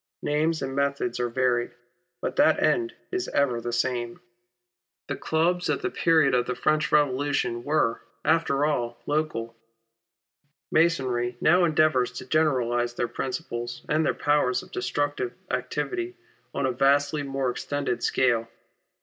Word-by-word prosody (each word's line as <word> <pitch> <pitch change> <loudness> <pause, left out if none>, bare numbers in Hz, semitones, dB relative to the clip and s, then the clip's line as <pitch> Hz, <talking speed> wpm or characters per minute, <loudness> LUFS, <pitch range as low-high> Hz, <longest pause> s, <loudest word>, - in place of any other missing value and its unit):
Names 155 +2 0
and 135 0 -4
methods 140 -4 -1
are 120 0 0
varied, 120 -1 0 0.5
but - - -3
that - - +5
end 350 0 +1 0.2
is 370 0 -2
ever 125 -5 +1
the 120 - -3
same. 120 -1 -1 0.9
The - - -2
clubs 175 +3 0
at - - -1
the - - -1
period 160 -5 +3
of 125 -1 +2
the 125 - -2
French 155 +3 +1
Revolution 140 -4 +1
were, 145 -6 +1 0.2
after 155 -3 +2
all, 120 -6 -1
local. 145 -7 -2 1.2
Masonry 130 -7 +1
now 175 +2 +4
endeavours 155 -6 +2
to 130 - -7
generalise 125 -5 +1
their 120 - -1
principles 120 -1 -5
and 155 +1 +2
their - - +1
powers 145 -4 +1
of - - -16
destructive 125 0 -2 0.2
activity 150 - -2 0.4
on 140 - -1
a 130 - +1
vastly 140 +3 +2
more 135 -2 -1
extended 140 -1 -3
scale. 120 -3 +2
135 Hz, 140 wpm, -26 LUFS, 120-155 Hz, 1.2 s, that